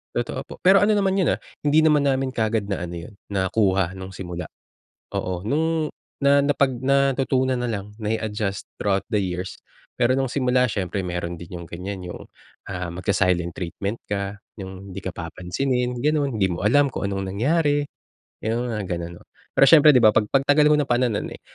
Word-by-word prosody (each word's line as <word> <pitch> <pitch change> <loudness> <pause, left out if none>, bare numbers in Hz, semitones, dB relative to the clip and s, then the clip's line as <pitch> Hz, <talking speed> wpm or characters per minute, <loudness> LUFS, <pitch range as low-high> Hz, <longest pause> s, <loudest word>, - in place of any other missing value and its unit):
Totoo - - -2
po, - - -9
pero 190 +2 +7
ano 210 +2 +3
naman 195 -1 +2
yun, 185 - +3
ah, - - -14 0.2
hindi 150 +2 +3
naman 150 -2 +4
namin 135 -1 +1
kaagad 110 -3 -1
na 100 - -1
ano 85 - -7
yun, 85 +5 -8
nakuha 95 -2 +1
nung 95 0 -8
simula. 90 -3 -6 0.6
Oo, 90 -1 -3
nung 155 +5 0 0.3
na 140 0 +5
napag 140 -3 +1
natutunan 130 -1 +2
na 125 - -1
lang 105 -3 -4
na 110 0 -1
i-adjust 105 -3 -3 0.2
throughout 100 -1 +1
the 105 - +2
years, 90 -1 -3 0.4
pero 125 +2 +3
nung 135 -2 0
simula 125 -2 +2
siyempre 95 -1 -2
meron 90 -1 -3
din 85 +1 -8
yung 85 - -9
ganyan 90 +2 -6
yung, 85 - -7 0.5
ah, 90 -1 -3
magsa-silent 90 -1 0
treatment 100 +5 -4
ka, 100 0 -3 0.2
yung 95 -1 -9
di 100 - -6
ka 95 - -3
papansinin 125 +10 -2
gano'n, 145 -3 0
hindi 95 - +3
mo 90 0 -3
alam 140 +7 +4
kung 130 - -5
anong 95 -1 -3
nangyari, 145 +5 +2 0.6
yung 120 +2 -2
mga 105 -4 -3
gano'n, 85 0 -5
no. - - -21 0.3
Pero 140 - +8
syempre 150 +1 +8
di 130 - +6
ba, 110 -3 +5
pag 105 -1 +2
pagtagal 145 +2 +4
mo 150 - +5
na 145 - +1
pa 120 - +2
na 125 - +2
no'n, 105 - -3
eh, - - -12
110 Hz, 190 wpm, -23 LUFS, 95-135 Hz, 0.6 s, Pero